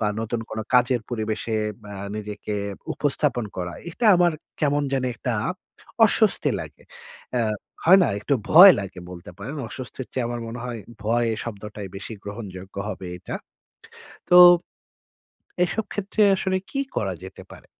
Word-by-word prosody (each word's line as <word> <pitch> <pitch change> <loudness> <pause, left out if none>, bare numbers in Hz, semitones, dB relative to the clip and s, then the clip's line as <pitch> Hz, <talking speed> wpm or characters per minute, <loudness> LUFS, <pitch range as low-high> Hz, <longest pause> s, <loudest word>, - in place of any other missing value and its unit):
বা 105 - +1
নতুন 115 +1 -2
কোনো 110 0 -3
কাজের 125 0 +4
পরিবেশে 110 -1 -2 0.4
আ - - -7 0.2
নিজেকে 105 0 -5 0.4
উপস্থাপন 140 -4 0
করা, 90 -1 -4 0.2
এটা 230 +6 -1
আমার 175 -1 +4 0.3
কেমন 145 -1 +2
জানি 130 -1 0
একটা 125 - -3 0.7
অস্বস্তি 215 0 +2
লাগে। - - -10 0.5
অ্যা 120 - +2 0.4
হয় 185 +4 +8
না, - - +3
একটু 140 +6 +1 0.2
ভয় 180 +4 +11
লাগে 95 -1 -8
বলতে 85 -1 -10
পারেন। 135 +10 -6
অস্বস্তির 130 0 -7
চেয়ে 125 -2 -1
আমার 120 0 -4
মনে 120 +1 -6
হয় 120 -3 -5 0.2
ভয় 115 +1 +2 0.2
শব্দটাই 105 -2 -7
বেশি 100 +3 -7
গ্রহণযোগ্য 100 -3 -8
হবে 95 -3 -6
এটা। - - -5 0.9
তো 180 - +7 1.3
এসব 205 +5 -2
ক্ষেত্রে 205 +2 -1
আসলে 190 0 0
কি 275 - -1 0.2
করা - - -1
যেতে - - -10
পারে? - - -14
120 Hz, 145 wpm, -24 LUFS, 105-150 Hz, 1.3 s, ভয়